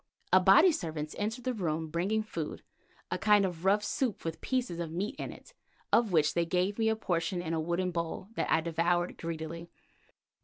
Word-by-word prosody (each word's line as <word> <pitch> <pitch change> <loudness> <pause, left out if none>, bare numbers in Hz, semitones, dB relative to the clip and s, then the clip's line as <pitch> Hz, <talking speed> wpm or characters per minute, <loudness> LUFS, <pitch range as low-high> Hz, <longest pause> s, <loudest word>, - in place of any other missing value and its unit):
Abati 370 - +7
servants 155 - -4
entered 220 +4 -2
the 255 - -1
room 165 -6 -2
bringing 195 +7 0
food, 170 -8 -5 0.5
a - - -1
kind 210 -2 +5
of 175 -1 -5
rough 205 +2 +4
soup 225 -2 -2
with 165 0 -4
pieces 250 -10 -1
of 165 -2 -3
meat 185 +6 -2
in - - -4
it - - -14 0.4
of 230 -3 +4
which 155 -3 +3
they 170 - +2
gave 180 +5 0
me 220 0 +3
a 220 - +2
portion 175 -4 -1
in 165 -2 -3
a 165 - 0
wooden 175 +3 -1
bowl 170 +2 -3
that - - -2
I 160 - +4
devoured 170 +2 0
greedily. 165 +1 -5
175 Hz, 190 wpm, -31 LUFS, 165-210 Hz, 0.5 s, Abati